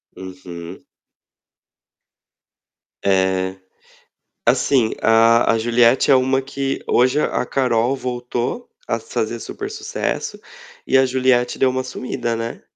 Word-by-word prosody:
Uhum. 90 -2 -9 2.2
É. 95 -1 +1 0.9
Assim, 125 -6 +2
a 115 +1 +4
a - - +1
Juliette 120 +3 +3
é - - +7
uma 130 +1 +2
que 135 0 -3
hoje 130 +4 +3
a 125 - 0
Carol 125 -1 +1
voltou 125 - -4 0.2
a - - -1
fazer 455 +2 -3
super 405 -1 -6
sucesso 440 +2 -4 0.5
e 135 - +3
a 130 - +5
Juliette 130 -1 +1
deu 130 - +4
uma 130 0 -2
sumida, 120 -2 -4
né. 115 +1 -5
125 Hz, 115 wpm, -20 LUFS, 115-130 Hz, 2.2 s, é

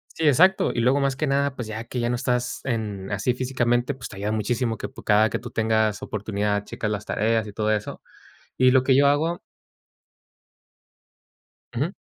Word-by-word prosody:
Sí, 160 -2 +1
exacto. 185 +7 +4
Y - - -2
luego 130 +4 +3
más 135 -1 0
que 155 +1 -1
nada, 140 0 +1
pues, 120 -3 -5
ya 110 +1 -5
que 125 +1 -4
ya 120 0 0
no 120 - 0
estás 125 -1 -1
en, 105 -6 -3
así 100 +5 0
físicamente, 125 0 0
pues, 125 -1 -9
te 100 - -11
ayuda 105 +2 -2
muchísimo 115 +2 -1
que - - -5
p - - -12
cada 105 +1 +4
que - - -3
tú 120 - -8
tengas 110 -1 +1
oportunidad 105 -1 -2
checas 110 - -4
las 105 - -4
tareas 110 +1 0
y 105 - -9
todo 110 0 0
eso. 105 0 -3 0.6
Y 130 0 +5
lo 130 0 +4
que 130 0 +3
yo 140 0 +5
hago 160 +4 +1 2.4
Ujú. 150 +9 -1
120 Hz, 195 wpm, -24 LUFS, 110-130 Hz, 2.4 s, Y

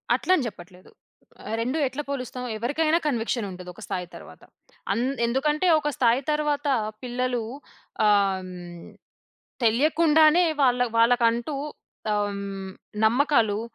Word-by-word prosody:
అట్లని 360 -9 +1
చెప్పట్లేదు. 180 -3 -12 0.7
2 255 +7 -1
ఎట్లా 265 +3 -5
పోలుస్తాం. 255 -2 -4
ఎవరికైనా 310 +7 +1
కన్విక్షన్ 235 -4 -1
ఉంటది 180 0 -9
ఒక - - -15
స్థాయి 180 -1 -4
తరువాత. - - -13 0.5
అన్ 235 - 0 0.2
ఎందుకంటే, 300 +7 +1
ఒక 295 0 -2
స్థాయి 240 +1 +3
తరువాత 295 -1 0 0.4
పిల్లలు 250 0 -1 0.6
ఆహ్, 200 -2 +3
హ్మ్, 175 -2 -10 0.8
తెలియకుండానే 310 +7 +4 0.2
వాళ్ళ 250 -2 +3 0.2
వాళ్ళకంటూ 235 +3 +3 0.6
ఆహ్, 205 0 0
హ్మ్. 195 -1 -6 0.3
నమ్మకాలు 230 -4 +2
245 Hz, 110 wpm, -25 LUFS, 205-290 Hz, 0.8 s, తెలియకుండానే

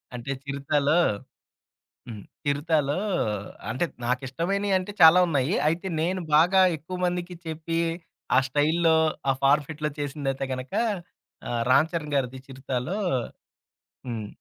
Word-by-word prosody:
అంటే, 125 +3 -5
'చిరుత'లో 140 +2 +1 1.1
హ్మ్. 110 -4 -8 0.2
'చిరుత'లో 145 +1 +1 0.7
అంటే, 130 +10 0 0.2
నాకిష్టమైనయంటే 180 +10 -1
చాలా 160 +3 +9
ఉన్నాయి. 145 0 +1
అయితే, 170 +5 0
నేను 185 +3 0
బాగా 180 +5 +5 0.2
ఎక్కువమందికి 180 +2 -3
చెప్పి, 160 +1 -3 0.6
ఆ - - +6
స్టైల్‌లో, 160 +4 +3 0.3
ఆ - - +6
ఫార్ఫిట్‌లో 150 +2 +2
చేసిందైతే 135 -2 -2
గనక, 130 0 -7 0.8
ఆహ్, 120 -1 -1
'రామ్ 140 +5 +5
చరణ్' 150 -3 -3
గారిది 130 -1 -1
'చిరుత'లో 135 +7 -3 1.1
హ్మ్. 115 -4 -4
150 Hz, 105 wpm, -26 LUFS, 135-170 Hz, 1.1 s, చాలా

